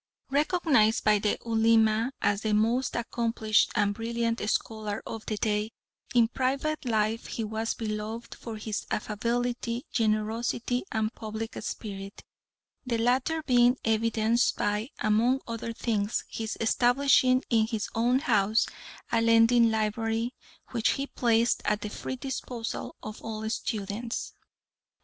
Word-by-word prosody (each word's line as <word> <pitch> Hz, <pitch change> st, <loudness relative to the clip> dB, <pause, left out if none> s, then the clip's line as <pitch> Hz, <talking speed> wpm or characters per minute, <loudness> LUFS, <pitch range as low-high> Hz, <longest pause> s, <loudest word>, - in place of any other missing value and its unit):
Recognised 285 Hz, -7 st, +3 dB
by 210 Hz, -1 st, +4 dB
the 205 Hz, +1 st, 0 dB
Ulema 225 Hz, +1 st, +3 dB
as 200 Hz, 0 st, +2 dB
the 215 Hz, -1 st, +1 dB
most 235 Hz, +5 st, +1 dB
accomplished 230 Hz, -2 st, +1 dB
and 205 Hz, -2 st, +2 dB
brilliant 230 Hz, +1 st, -1 dB
scholar 215 Hz, -2 st, -2 dB
of 225 Hz, -1 st, -6 dB
the 215 Hz, -, -2 dB
day, 210 Hz, 0 st, 0 dB, 0.5 s
in 235 Hz, -2 st, +6 dB
private 275 Hz, +5 st, -1 dB
life 220 Hz, -1 st, 0 dB
he 230 Hz, -, -3 dB
was 220 Hz, +1 st, -2 dB
beloved 220 Hz, +1 st, -4 dB
for 225 Hz, -2 st, -7 dB
his 215 Hz, -1 st, -4 dB
affability, 235 Hz, +3 st, -2 dB
generosity, 225 Hz, +2 st, 0 dB
and 220 Hz, +1 st, -1 dB
public 220 Hz, 0 st, -6 dB
spirit, 195 Hz, -2 st, -6 dB, 0.6 s
the 245 Hz, -4 st, -1 dB
latter 255 Hz, +7 st, +1 dB
being 245 Hz, -2 st, +4 dB
evidenced 225 Hz, +1 st, +2 dB
by, 210 Hz, +4 st, -1 dB
among 235 Hz, +5 st, +2 dB
other 230 Hz, 0 st, -4 dB
things, 220 Hz, -2 st, -1 dB
his 220 Hz, -1 st, -4 dB
establishing 255 Hz, +2 st, +4 dB
in 220 Hz, -2 st, +4 dB
his 220 Hz, -2 st, -2 dB
own 240 Hz, +3 st, +3 dB
house 215 Hz, -5 st, +3 dB, 0.5 s
a 230 Hz, -, +3 dB
lending 230 Hz, +1 st, +5 dB
library, 225 Hz, +2 st, -1 dB, 0.4 s
which 230 Hz, -3 st, +2 dB
he 275 Hz, -, -2 dB
placed 235 Hz, -3 st, +2 dB
at 210 Hz, 0 st, 0 dB
the 210 Hz, -, -4 dB
free 260 Hz, -, -5 dB
disposal 250 Hz, -3 st, -5 dB
of 215 Hz, 0 st, -7 dB
all 220 Hz, -1 st, -4 dB
students. 220 Hz, +1 st, -3 dB
225 Hz, 130 wpm, -28 LUFS, 215-240 Hz, 0.6 s, in